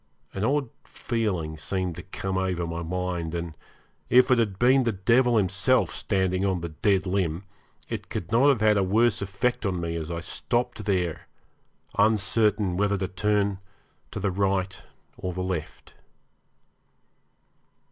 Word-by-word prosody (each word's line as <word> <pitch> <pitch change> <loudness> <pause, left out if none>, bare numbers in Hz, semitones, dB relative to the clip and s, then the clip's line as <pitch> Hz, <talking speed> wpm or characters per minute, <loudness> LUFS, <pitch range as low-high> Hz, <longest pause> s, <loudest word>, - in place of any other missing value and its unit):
An 95 - -3
odd 135 +2 +1
feeling 95 -10 -3
seemed 90 +2 -2
to 85 - -7
come 95 0 -4
over 95 -2 -1
my 85 0 -4
mind, 85 -1 -3
and 85 -2 -4 0.5
if 125 +1 +5
it 125 - +5
had 105 -5 0
been 130 +4 +5
the 120 -2 +1
devil 120 +5 +3
himself 95 +5 +2
standing 95 -2 0
on 95 -3 0
the 85 - -4
dead 95 +5 +1
limb 90 -2 -1 0.4
it - - -5
could 90 +3 -5
not 125 +5 +5
have 130 -6 +2
had 105 -1 +4
a 100 - +3
worse 105 +3 +2
effect 100 +5 -1
on 95 -4 -1
me 85 -1 -3
as 80 -1 -4
I 85 -1 -3
stopped 120 +4 -2
there, 90 -5 -1 0.7
uncertain 105 -2 +2
whether 100 0 +1
to 95 0 -2
turn 100 +1 0 0.5
to - - -6
the 100 0 0
right 95 0 -1 0.4
or 90 -1 -4
the 90 +1 -3
left. 90 -4 -5
95 Hz, 155 wpm, -26 LUFS, 90-110 Hz, 0.7 s, if